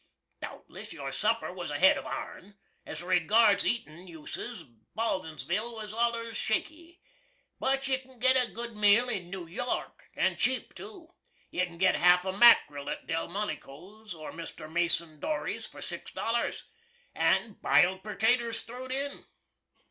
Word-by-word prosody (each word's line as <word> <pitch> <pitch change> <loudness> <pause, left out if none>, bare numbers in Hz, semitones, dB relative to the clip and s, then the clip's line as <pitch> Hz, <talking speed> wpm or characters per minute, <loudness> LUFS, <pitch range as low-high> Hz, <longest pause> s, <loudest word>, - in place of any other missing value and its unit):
Dowtless, - - -8
your - - -6
supper - - 0
was - - -6
ahead - - +5
of - - -6
our'n. 200 +2 -7 0.3
As - - -6
regards 200 +4 +4
eatin' 185 -7 -2
uses, 160 -3 -7 0.3
Baldinsville 210 +1 -2
was 215 -2 -3
allers 230 0 -1
shaky. 330 +12 -2 0.6
But 270 +1 +1
you 265 -1 +2
can 260 -1 -16
git 260 +3 +5
a 250 -2 +3
good 235 -1 -5
meal 210 +4 +5
in 185 -7 -3
New 185 -2 -6
York, 220 +9 -4
& - - +2
cheap 255 +1 +1
to. 345 -3 -10 0.4
You 180 - +1
can 170 -1 -13
git 185 +1 +4
half 180 +1 +5
a 190 - -2
mackril 145 -10 +6
at - - -6
Delmonico's 185 +2 -5
or 155 -1 -8
Mr. 165 -1 -8
Mason 170 -1 -1
Dory's 305 - -3
for - - -11
six - - -6
dollars, 235 +1 -1 0.5
and 215 -4 +1
biled 185 +1 +4
pertaters 230 +2 +1
throw'd 255 +2 -8
in. 280 +2 -2
215 Hz, 145 wpm, -29 LUFS, 175-240 Hz, 0.6 s, mackril